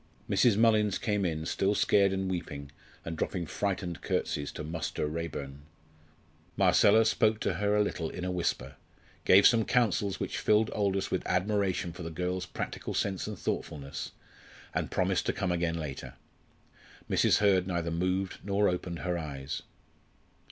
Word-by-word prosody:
Mrs. 115 -5 +3
Mullins 110 -3 +4
came 105 -2 -1
in 80 -2 -2
still 100 +4 +1
scared 100 -1 +4
and 95 0 -1
weeping, 70 -6 -5 0.3
and 85 - -4
dropping 85 +2 -2
frightened 90 0 -3
curtseys 70 0 -2
to - - -6
"Muster 80 -1 -3
Raeburn." 75 -3 -5 1.0
Marcella 110 +2 +5
spoke 110 -1 +2
to - - 0
her 105 0 +2
a 105 - +4
little 85 -5 -3
in 90 - -5
a 90 - -1
whisper, 80 -7 -2 0.5
gave 95 +2 +7
some 115 -2 +6
counsels 105 -6 +1
which - - -3
filled 110 +1 +3
Aldous 100 -2 0
with - - 0
admiration 95 -2 0
for 90 - -9
the 80 - -4
girl's 90 +2 -3
practical - - -5
sense 95 -1 -1
and 105 -2 -5
thoughtfulness, 70 -5 -4 0.6
and - - -1
promised - - 0
to - - +1
come 90 - -1
again 85 -1 0
later. 75 -5 -6 0.9
Mrs. - - +3
Hurd 95 -3 +3
neither 85 -2 -2
moved 90 +3 -1
nor 100 +1 +2
opened 90 -1 -4
her 90 -1 0
eyes. 70 -3 -5
90 Hz, 155 wpm, -30 LUFS, 85-100 Hz, 1.0 s, gave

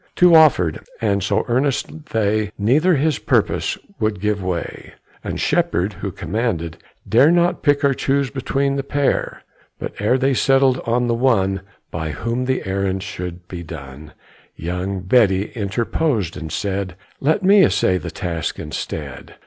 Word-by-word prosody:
Two 180 -1 +6
offered, 135 - +5 0.2
and 100 -3 +1
so 95 - 0
earnest 140 +4 -1
they, 110 -1 0
Neither 150 - +3
his 150 0 +1
purpose - - 0 0.2
would 110 -2 0
give 105 0 -1
way; 90 -2 -4 0.3
And - - -4
Shepherd, 95 +4 +1
who 95 +1 -5
commanded, 85 -3 -3 0.3
dare 125 +7 +5
Not 175 +1 +2
pick 145 -1 +2
or 140 - +4
choose 135 0 0
between 140 +1 -1
the 135 - -2
pair. 140 0 -1 0.3
But - - -6
ere 110 +5 +2
they 135 +1 +2
settled 135 0 +3
on 120 +1 +2
the 120 - +1
one 100 -6 +1 0.3
By 80 -1 -3
whom 115 - -2
the 130 0 -1
errand 95 0 -1
should 90 -3 -7
be 90 -2 -7
done, 75 -2 -10 0.4
Young 90 +3 -3
Betty 100 -1 +3
interposed, 110 - -1
and 80 - -7
said, 95 -2 -3 0.2
"Let 155 +8 +1
me 195 +1 +6
essay 95 - +2
the - - -6
task 85 -3 -4
instead. 75 - -6
110 Hz, 150 wpm, -20 LUFS, 95-135 Hz, 0.4 s, Two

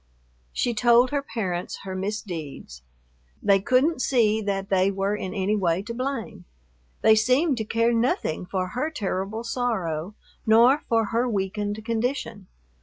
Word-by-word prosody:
She 240 - 0
told 240 +3 +4
her 285 -1 0
parents 185 -10 -4
her 190 -1 -5
misdeeds. 175 - -5 0.6
They 195 -1 +4
couldn't 255 +8 +2
see 220 -5 +2
that 195 -1 -2
they 190 0 +3
were 195 +1 -1
in 190 -3 -5
any 200 +2 +1
way 180 -2 0
to 230 - -6
blame. 255 - -4 0.6
They 220 - +7
seemed 255 +7 +3
to 220 - -2
care 230 +2 +1
nothing 225 -8 0
for 185 -1 -2
her 255 +10 -2
terrible 210 -5 -3
sorrow 210 -8 -2 0.3
nor 235 +6 +5
for 225 -1 +3
her 240 +2 +1
weakened 205 +1 -2
condition. 230 -3 -2
215 Hz, 145 wpm, -25 LUFS, 190-240 Hz, 0.6 s, They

